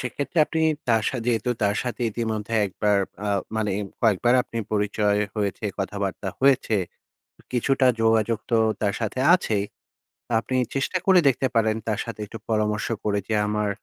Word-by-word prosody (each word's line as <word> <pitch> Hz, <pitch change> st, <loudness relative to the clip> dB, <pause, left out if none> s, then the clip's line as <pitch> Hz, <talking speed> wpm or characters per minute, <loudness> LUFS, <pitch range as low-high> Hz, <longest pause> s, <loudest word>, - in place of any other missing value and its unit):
সেক্ষেত্রে 140 Hz, +6 st, -3 dB
আপনি 160 Hz, -, -2 dB, 0.3 s
তার 110 Hz, -2 st, +3 dB
সা -, -, -3 dB
যেহেতু 120 Hz, 0 st, +1 dB
তার 100 Hz, 0 st, +2 dB
সাথে 125 Hz, -1 st, -5 dB
ইতিমধ্যে 110 Hz, -1 st, -3 dB
একবার 100 Hz, +1 st, +1 dB, 0.3 s
আ -, -, 0 dB, 0.3 s
মানে 105 Hz, -2 st, 0 dB, 0.3 s
কয়েকবার 115 Hz, +2 st, +3 dB
আপনি 115 Hz, -, -6 dB
পরিচয় 105 Hz, 0 st, +1 dB, 0.2 s
হয়েছে, 100 Hz, +1 st, -2 dB
কথাবার্তা 100 Hz, 0 st, -3 dB
হয়েছে, 130 Hz, -5 st, +3 dB, 0.8 s
কিছুটা 130 Hz, +1 st, +2 dB
যোগাযোগ 115 Hz, 0 st, +2 dB
তো 115 Hz, -, +4 dB, 0.2 s
তার 100 Hz, -1 st, +1 dB
সাথে 110 Hz, +3 st, -2 dB
আছেই। 105 Hz, -, +1 dB, 0.7 s
আপনি 130 Hz, +3 st, -4 dB, 0.2 s
চেষ্টা 135 Hz, +7 st, 0 dB
করে 190 Hz, -2 st, +6 dB
দেখতে 135 Hz, 0 st, +2 dB
পারেন 110 Hz, -1 st, +3 dB
তার 110 Hz, -1 st, 0 dB
সাথে 115 Hz, -2 st, -7 dB
একটু 110 Hz, +2 st, -9 dB
পরামর্শ 105 Hz, -1 st, 0 dB, 0.2 s
করে 100 Hz, -1 st, 0 dB
যে, 110 Hz, -, 0 dB
আমার 105 Hz, -1 st, 0 dB
110 Hz, 150 wpm, -24 LUFS, 105-120 Hz, 0.8 s, করে